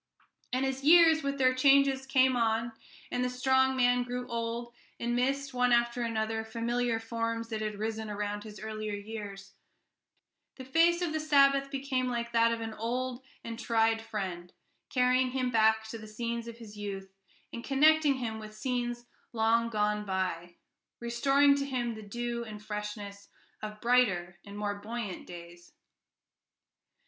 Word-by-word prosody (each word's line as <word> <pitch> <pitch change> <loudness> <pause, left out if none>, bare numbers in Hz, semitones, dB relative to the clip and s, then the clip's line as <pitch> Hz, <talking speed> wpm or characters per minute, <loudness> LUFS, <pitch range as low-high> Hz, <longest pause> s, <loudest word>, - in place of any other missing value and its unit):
And 255 +2 +1
as 265 0 -3
years, 325 +1 +7
with 280 -1 -2
their 255 -1 +4
changes, 270 0 +4
came 260 -1 +4
on, 230 0 +1 0.4
and 245 - 0
the 250 - 0
strong 260 +1 +2
man 245 -1 +3
grew 245 0 -4
old, 235 0 -4 0.3
and 240 0 -1
missed, 275 +2 0
one 250 0 +2
after 240 0 +2
another, 220 -1 -1
familiar 230 +1 -1
forms 230 0 -3
that 220 -2 -3
had 210 -1 -3
risen 220 0 -3
around 205 0 -3
his 210 -2 -10
earlier 215 -1 -4
years, 200 -2 -8 1.0
the 260 - -9
face 335 +6 +3
of 330 -3 -1
the 315 - 0
Sabbath 275 -2 +4
became 265 -2 -1
like 235 -1 -2
that 230 0 +4
of 230 0 -2
an 225 -1 -4
old 245 +3 -3 0.2
and 230 0 -6
tried 225 -1 +2
friend, 190 -6 -5 0.4
carrying 255 0 +3
him 255 -1 0
back 220 -1 +3
to 230 - -6
the 215 - -10
scenes 235 +2 -4
of 235 0 -8
his 220 -3 -11
youth, 195 -2 -6 0.4
and 235 - -6
connecting 295 +1 +4
him 225 -4 -4
with 215 0 -10
scenes 240 0 -2 0.3
long 230 +1 +2
gone 210 -1 0
by, 185 -3 -3 0.4
restoring 275 +4 +3
to 280 0 0
him 245 -3 -2
the 220 - -9
dew 235 +3 -4
and 210 -2 -9
freshness 210 -1 -6 0.3
of 215 0 -6
brighter 195 -9 +2
and 200 +1 -9
more 205 -1 -1
buoyant 220 -3 -5
days. 175 0 -12
235 Hz, 160 wpm, -30 LUFS, 215-255 Hz, 1.0 s, years